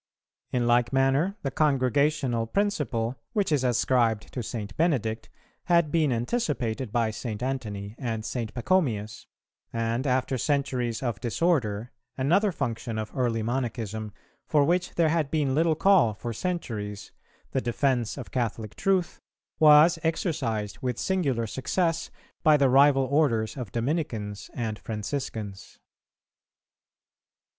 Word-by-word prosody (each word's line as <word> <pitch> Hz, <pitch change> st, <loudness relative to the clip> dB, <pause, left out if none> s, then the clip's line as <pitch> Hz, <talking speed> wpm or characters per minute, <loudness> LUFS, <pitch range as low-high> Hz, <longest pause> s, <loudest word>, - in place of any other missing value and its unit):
In 125 Hz, -1 st, +1 dB
like 120 Hz, 0 st, +3 dB
manner 135 Hz, +9 st, +2 dB
the 135 Hz, -, -1 dB
Congregational 135 Hz, -3 st, +1 dB
principle, 135 Hz, -, -1 dB, 0.2 s
which 205 Hz, -6 st, 0 dB
is 145 Hz, -4 st, +2 dB
ascribed 120 Hz, -3 st, +1 dB
to 125 Hz, -, -3 dB
St. 105 Hz, -3 st, -5 dB
Benedict, 115 Hz, -10 st, 0 dB, 0.4 s
had 170 Hz, -4 st, +3 dB
been 155 Hz, -4 st, +2 dB
anticipated 125 Hz, -, -1 dB
by 115 Hz, -1 st, +1 dB
St. 110 Hz, 0 st, -5 dB
Antony 105 Hz, -6 st, -4 dB
and 115 Hz, -4 st, -3 dB
St. 115 Hz, -3 st, -3 dB
Pachomius; 120 Hz, -, 0 dB, 0.4 s
and 115 Hz, +3 st, -1 dB
after 130 Hz, 0 st, 0 dB
centuries 125 Hz, -4 st, -1 dB
of 120 Hz, -5 st, -2 dB
disorder, 120 Hz, -4 st, 0 dB, 0.3 s
another 180 Hz, +10 st, +3 dB
function 115 Hz, -7 st, -3 dB
of 110 Hz, 0 st, -4 dB
early 120 Hz, -4 st, 0 dB
Monachism, 110 Hz, -3 st, -3 dB, 0.4 s
for 150 Hz, -2 st, +4 dB
which 180 Hz, +3 st, 0 dB
there 165 Hz, -2 st, +3 dB
had 155 Hz, -3 st, +1 dB
been 145 Hz, -4 st, +1 dB
little 160 Hz, +2 st, +3 dB
call 170 Hz, -, +4 dB
for 115 Hz, +2 st, -5 dB
centuries, 110 Hz, -, -4 dB, 0.4 s
the 130 Hz, -, 0 dB
defence 120 Hz, -1 st, 0 dB
of 125 Hz, -, -8 dB
Catholic 115 Hz, -4 st, -2 dB
truth, 190 Hz, -3 st, 0 dB, 0.4 s
was 155 Hz, +2 st, +7 dB
exercised 145 Hz, -, -2 dB
with 125 Hz, -2 st, -2 dB
singular 140 Hz, -12 st, 0 dB
success 165 Hz, -, -1 dB, 0.3 s
by 155 Hz, -1 st, +5 dB
the 140 Hz, -2 st, +3 dB
rival 135 Hz, +1 st, +5 dB
orders 130 Hz, -5 st, +1 dB
of 125 Hz, -8 st, -6 dB
Dominicans 115 Hz, -6 st, -3 dB
and 110 Hz, -3 st, -3 dB
Franciscans. 105 Hz, -3 st, -5 dB
130 Hz, 125 wpm, -27 LUFS, 115-150 Hz, 0.4 s, was